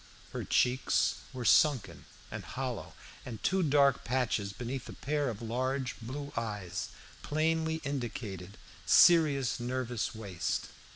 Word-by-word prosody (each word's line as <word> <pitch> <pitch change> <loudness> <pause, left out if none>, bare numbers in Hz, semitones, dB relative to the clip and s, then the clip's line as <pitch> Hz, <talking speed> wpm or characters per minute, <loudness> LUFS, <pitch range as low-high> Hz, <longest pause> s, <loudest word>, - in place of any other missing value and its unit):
Her - - -3
cheeks 125 +1 +2
were 125 -2 -5
sunken 135 +2 +3 0.3
and - - -5
hollow, - - -5 0.3
and 120 -3 -6
two 190 +1 +2
dark 140 -4 +4
patches 115 -5 0
beneath 125 +5 -5
a - - -7
pair 145 -1 -1
of 115 0 -6
large 130 +3 -1
blue 140 +5 -6
eyes 105 -6 -3 0.3
plainly 160 +1 0
indicated 110 -8 -5 0.3
serious 150 -8 +5
nervous 125 -1 -2
waste. 100 -6 -3
125 Hz, 120 wpm, -31 LUFS, 115-145 Hz, 0.3 s, serious